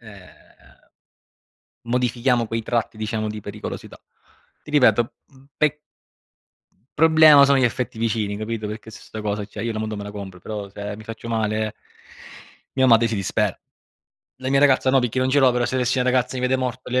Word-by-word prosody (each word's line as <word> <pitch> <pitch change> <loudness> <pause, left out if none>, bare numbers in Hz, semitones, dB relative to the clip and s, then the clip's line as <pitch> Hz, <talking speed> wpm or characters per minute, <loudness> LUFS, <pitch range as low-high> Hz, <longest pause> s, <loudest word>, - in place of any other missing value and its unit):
ehm, 100 -5 -14 1.6
modifichiamo 120 0 0
quei 115 +1 -2
tratti, 115 -1 -2
diciamo, 110 0 -2
di 105 0 -5
pericolosità. - - -8 0.6
Ti - - -11
ripeto, 120 -5 +3
mhmm, 135 -1 -21
pe 150 0 +2 1.2
Problema 155 -2 +7
sono 140 0 +4
gli 130 - +3
affetti 120 -1 -2
vicini, 110 -3 -1
capito? 110 0 -4
Perché 110 +1 -7
su 110 - -12
'sta 110 - -9
cosa 105 0 -2
cioè, 105 0 -8
io 115 0 -2
la 110 - -4
moto 110 0 -3
me 100 - -6
la 105 - -7
compro, 100 -3 -8
però 105 +2 -6
se 100 +1 -6
mi 110 - -12
faccio 115 +1 -8
male 110 -1 -1 1.0
mia 130 -1 +4
madre 115 -1 +5
si 110 - -2
dispera. 100 -2 -1 0.8
La 130 0 -3
mia 135 0 +3
ragazza 135 -2 +4
no 135 - +4
perché 125 0 -2
non 130 0 +1
ce 145 - +3
l'ho, 135 -2 +5
però 125 0 0
se 120 - -3
avessi 130 +1 +1
una 125 0 +2
ragazza 125 0 0
mi 125 - -4
vede 130 +1 +2
morto, 125 0 -4
le, 130 +1 +2
115 Hz, 190 wpm, -22 LUFS, 110-130 Hz, 1.6 s, Problema